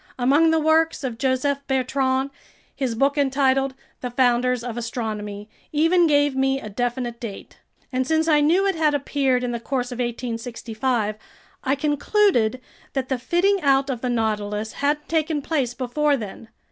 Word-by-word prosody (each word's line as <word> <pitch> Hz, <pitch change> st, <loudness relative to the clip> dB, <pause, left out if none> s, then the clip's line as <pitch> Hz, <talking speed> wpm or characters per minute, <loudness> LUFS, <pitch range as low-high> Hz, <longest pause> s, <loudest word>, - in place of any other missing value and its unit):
Among 280 Hz, +6 st, +4 dB
the 320 Hz, 0 st, +3 dB
works 315 Hz, 0 st, +2 dB
of 240 Hz, -4 st, -4 dB
Joseph 270 Hz, +2 st, +1 dB
Bertrand, 265 Hz, 0 st, 0 dB, 0.4 s
his 260 Hz, -4 st, -2 dB
book 280 Hz, +4 st, +2 dB
entitled 270 Hz, -1 st, +2 dB, 0.2 s
The 250 Hz, -, -4 dB
Founders 245 Hz, 0 st, +2 dB
of 240 Hz, -2 st, -5 dB
Astronomy 215 Hz, -3 st, -4 dB, 0.2 s
even 330 Hz, +3 st, +4 dB
gave 290 Hz, -2 st, +3 dB
me 270 Hz, 0 st, +1 dB
a 215 Hz, -, -8 dB
definite 240 Hz, +2 st, -3 dB
date; 220 Hz, -5 st, -8 dB, 0.3 s
and 255 Hz, 0 st, 0 dB
since 320 Hz, +1 st, +2 dB
I 300 Hz, -2 st, +4 dB
knew 345 Hz, +7 st, +3 dB
it 390 Hz, -, +2 dB
had 310 Hz, -3 st, +2 dB
appeared 270 Hz, -2 st, 0 dB
in 245 Hz, -, -1 dB
the 235 Hz, -, -3 dB
course 250 Hz, +1 st, -2 dB
of 245 Hz, -, -6 dB
1865, 235 Hz, -2 st, -2 dB, 0.5 s
I 270 Hz, 0 st, +1 dB
concluded 290 Hz, -, +2 dB, 0.3 s
that 265 Hz, -2 st, -2 dB
the 260 Hz, -2 st, -1 dB
fitting 360 Hz, +9 st, +2 dB
out 275 Hz, -1 st, +3 dB
of 245 Hz, -3 st, -4 dB
the 250 Hz, -, -1 dB
Nautilus 215 Hz, -2 st, -1 dB
hadn't 295 Hz, +1 st, -1 dB
taken 315 Hz, -1 st, 0 dB
place 270 Hz, -6 st, -1 dB
before 280 Hz, +4 st, +1 dB
then. 215 Hz, 0 st, -8 dB
265 Hz, 160 wpm, -23 LUFS, 240-290 Hz, 0.5 s, Among